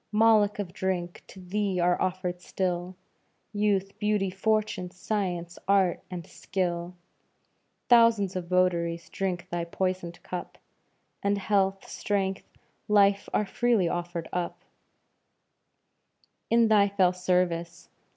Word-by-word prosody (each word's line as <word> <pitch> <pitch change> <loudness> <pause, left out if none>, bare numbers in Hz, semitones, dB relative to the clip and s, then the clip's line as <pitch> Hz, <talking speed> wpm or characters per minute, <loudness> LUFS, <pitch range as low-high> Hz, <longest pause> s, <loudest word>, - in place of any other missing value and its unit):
Moloch 215 -1 +4
of 195 -4 -5
drink! 180 -2 -3
to 190 - -13
thee 190 0 -1
are 175 0 +2
offered 180 -1 -2
still 180 0 -2 0.6
Youth, 200 -2 0
beauty, 210 -2 +1
fortune, 210 -2 0
science, 180 -2 -3
art, 195 -3 +3
and 175 -3 -6
skill; 175 -2 -3 0.9
Thousands 230 -5 +5
of 180 -2 -4
votaries 170 -2 +1
drink 185 -2 -3
thy 170 0 -1
poisoned 180 0 -3
cup, 180 - -6 0.6
And 200 0 +1
health, 195 -1 0
strength, 195 -2 -2 0.4
life 200 -1 +3
are 210 - +1
freely 230 -3 +2
offered 175 -1 -3
up 175 -1 -3 1.9
In 230 0 +5
thy 205 -2 +5
fell 190 -2 +3
service. 180 -2 -1
185 Hz, 110 wpm, -27 LUFS, 175-200 Hz, 1.9 s, Thousands